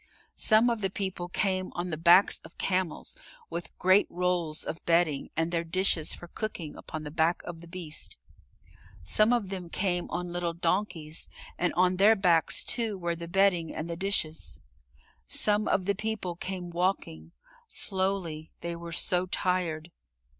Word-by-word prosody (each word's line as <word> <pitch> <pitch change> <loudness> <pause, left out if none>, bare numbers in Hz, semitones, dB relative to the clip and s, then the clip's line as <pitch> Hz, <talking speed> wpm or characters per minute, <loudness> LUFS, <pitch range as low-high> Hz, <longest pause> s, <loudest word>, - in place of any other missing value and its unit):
Some 225 +2 +5
of 230 -2 -2
the 195 - +1
people 185 -2 -3
came 185 0 0
on 175 0 -3
the - - -1
backs 170 +5 +5
of 165 - -16
camels, 185 -3 -1 0.4
with 175 - -6
great 185 +2 +4
rolls 175 -3 0
of 165 - -6
bedding 165 -4 +2
and 165 +1 +1
their 170 -1 0
dishes 170 -2 +1
for 175 - -11
cooking 175 -5 -5
upon 155 -1 -7
the 150 - -6
back 165 +2 +1
of 170 -2 -8
the 170 - -12
beast. 170 -3 -4 0.9
Some 215 - +3
of 235 -6 +1
them 185 -3 -5
came 180 -1 0
on 175 0 -3
little 175 -1 -1
donkeys, 170 -3 -2 0.3
and 180 - 0
on 180 +1 +3
their 210 +4 +6
backs 175 -5 +3
too 225 -4 0
were 170 -2 -2
the 170 0 -7
bedding 180 -3 +2
and 155 - -4
the 170 - -4
dishes. 170 -4 -1 0.7
Some 210 0 +3
of 185 - +1
the 200 - +2
people 210 -3 -3
came 180 0 -5
walking 170 - -2 0.3
slowly; 185 -5 -1
they 170 0 -3
were 170 0 -8
so 180 +1 +1
tired. 175 -3 -1
175 Hz, 160 wpm, -29 LUFS, 165-190 Hz, 0.9 s, their